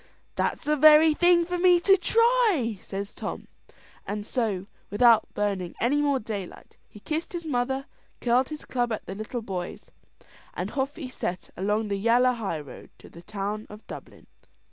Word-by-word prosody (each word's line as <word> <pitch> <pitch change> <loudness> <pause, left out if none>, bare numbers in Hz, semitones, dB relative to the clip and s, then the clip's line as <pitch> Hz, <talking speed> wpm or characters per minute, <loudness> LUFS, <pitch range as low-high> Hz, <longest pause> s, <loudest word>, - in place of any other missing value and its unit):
"That's - - -1
the 300 - +2
very 310 +1 +7
thing 345 +1 +4
for 355 +1 -3
me 355 -1 +5
to 390 +2 +6
try," 410 - +2
says 200 +1 -6
Tom; - - -6 0.6
and 205 0 -4
so, 210 -7 -1 0.2
without 230 +1 +4
burning 195 -4 -2
any 285 +5 +2
more 285 -2 +2
daylight, 205 -6 -7
he 210 - -13
kissed 315 - -3
his 340 -1 -5
mother, 265 -1 -1 0.3
curled 250 +2 +2
his 305 -1 -7
club 240 -2 -1
at 220 - -4
the 190 - -6
little 215 +4 -5
boys, 185 -4 -6 0.6
and - - -3
off 275 +1 -2
he 295 -6 -6
set 185 -7 -5
along 210 +3 -1
the 200 -1 -1
yalla 240 +4 +4
highroad 165 - -6
to - - -15
the 170 - -13
town 210 +2 -4
of 210 +1 -12
Dublin. - - -11
240 Hz, 165 wpm, -26 LUFS, 205-300 Hz, 0.6 s, very